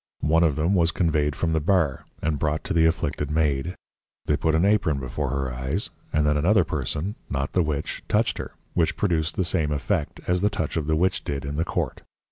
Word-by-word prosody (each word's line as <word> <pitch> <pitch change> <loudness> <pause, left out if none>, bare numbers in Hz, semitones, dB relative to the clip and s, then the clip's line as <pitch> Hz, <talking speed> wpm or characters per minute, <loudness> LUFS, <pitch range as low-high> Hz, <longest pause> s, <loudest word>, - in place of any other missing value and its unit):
One 80 +3 +4
of 80 -4 +3
them 80 +6 +1
was 85 -3 +4
conveyed 75 -5 +1
from 80 +1 0
the 80 - +2
Bar, 80 -4 +1 0.2
and 75 -2 0
brought 75 0 0
to - - -2
the 80 0 +5
Afflicted 80 -3 -1
Maid. 75 +2 0 0.5
They - - +2
put 80 -1 +1
an 80 +4 +3
Apron 100 -9 +2
before 65 +2 -3
her 70 -1 -2
Eyes, 65 +10 -1 0.2
and 75 0 +2
then 75 0 +3
another 95 +6 +4
person 75 +6 -2 0.2
(not - - -2
the 90 - +3
Witch) 75 -3 -2
touched - - +1
her, - - -6 0.2
which 85 -2 +1
produced 85 -5 0
the 95 - 0
same 80 -4 +1
effect, 75 +2 -1
as 90 0 +1
the 105 - +3
Touch 80 -7 -3
of 80 -3 -1
the 80 - +2
Witch 90 +4 +1
did 70 -1 -3
in 70 +1 -4
the 80 +2 0
Court. - - -2
80 Hz, 220 wpm, -25 LUFS, 75-85 Hz, 0.5 s, the